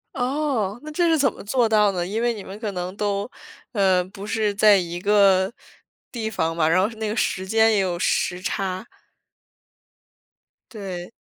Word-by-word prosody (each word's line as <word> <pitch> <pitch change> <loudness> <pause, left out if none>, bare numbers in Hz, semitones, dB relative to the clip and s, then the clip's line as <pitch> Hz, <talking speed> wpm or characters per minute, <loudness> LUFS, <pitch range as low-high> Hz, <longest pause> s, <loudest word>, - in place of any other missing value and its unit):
哦， 250 -5 -1
那 305 - -7
这 340 +2 +1
是 325 - +3
怎 275 -4 +3
么 - - -11
做 235 +3 +1
到 210 -2 +3
的？ 175 -2 -2
因 215 +5 -2
为 240 0 +1
你 205 - -8
们 195 +2 -9
可 215 -3 -3
能 180 +1 -5
都， 205 +1 -2 0.4
呃 190 -5 +3
不 195 +2 -10
是 210 -1 0
在 205 0 +6
一 175 -1 -3
个 195 -1 +4 0.6
地 225 -3 -3
方 165 -6 -1
嘛， 160 -2 +2
然 170 +3 +3
后 190 - +3
那 220 -1 -3
个 215 - -2
时 190 -4 -1
间 220 +2 +4
也 210 - +2
有 185 -3 -1
时 180 0 0
差。 190 +1 -3 1.9
对。 190 -5 -7
205 Hz, 190 characters per minute, -23 LUFS, 185-220 Hz, 1.9 s, 在